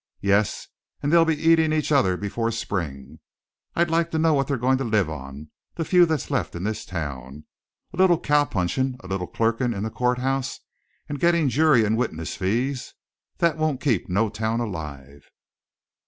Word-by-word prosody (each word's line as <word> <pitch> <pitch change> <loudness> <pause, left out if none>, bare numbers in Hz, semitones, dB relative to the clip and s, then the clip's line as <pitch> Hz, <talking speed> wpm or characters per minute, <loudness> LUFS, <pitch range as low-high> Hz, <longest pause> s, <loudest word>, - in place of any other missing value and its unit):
"Yes, 100 +1 +1 0.4
and 145 +3 0
they'll 165 -1 +6
be 160 -1 +1
eatin' 160 -1 +4
each 155 -1 0
other 110 -11 +3
before 105 +4 -2
spring! 85 - -5 0.6
I'd 170 -1 +1
like 165 0 +2
to 160 - -2
know 160 0 +3
what 135 -2 +1
they're 140 - 0
goin' 130 +2 +1
to - - -1
live 110 -8 +1
on, 70 +1 -9 0.2
the 165 - -2
few 180 0 +5
that's 160 -2 -2
left 135 - -1
in 85 - -5
this 110 +1 -3
town 75 -4 -6 0.5
a - - -9
little 185 -3 +4
cow 145 0 +3
punchin', 125 +6 -1
a 95 - -11
little 95 -1 -3
clerkin' 115 +1 0
in 100 - -3
the 110 - -3
courthouse 125 +2 -1 0.5
and 145 -1 -5
gittin' 170 -3 +3
jury 140 -4 +4
and 110 +1 +1
witness 80 -10 -3
fees. 120 +8 -2 0.4
That 170 -2 +2
won't 155 -4 0
keep 120 - 0
no 105 +5 +1
town 110 +2 -2
alive." 75 - -7
120 Hz, 180 wpm, -24 LUFS, 95-150 Hz, 0.6 s, they'll